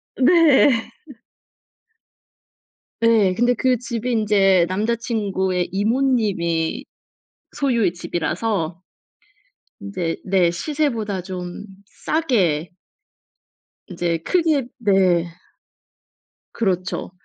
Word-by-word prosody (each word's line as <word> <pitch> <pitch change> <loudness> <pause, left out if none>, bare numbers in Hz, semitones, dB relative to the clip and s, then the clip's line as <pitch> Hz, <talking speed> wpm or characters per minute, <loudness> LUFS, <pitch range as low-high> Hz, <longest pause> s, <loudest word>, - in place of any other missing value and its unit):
네. 280 -5 +4 2.1
네. 220 -5 +4
근데 240 +4 +2
그 255 +1 +1
집이 235 0 -4
인제 200 -5 +3
남자친구의 200 -3 -1
이모님이 205 -7 0 0.7
소유의 235 -10 +1
집이라서 175 0 -3 1.0
인제 185 -5 -4
네. 185 -3 +2
시세보다 230 - -2
좀 180 +1 -7 0.2
싸게 190 - 0 1.2
인제 170 -3 -2
크게 315 -8 +1
네. 190 -5 +2 1.3
그렇죠. 185 -5 -2
205 Hz, 150 characters per minute, -21 LUFS, 180-240 Hz, 2.1 s, 네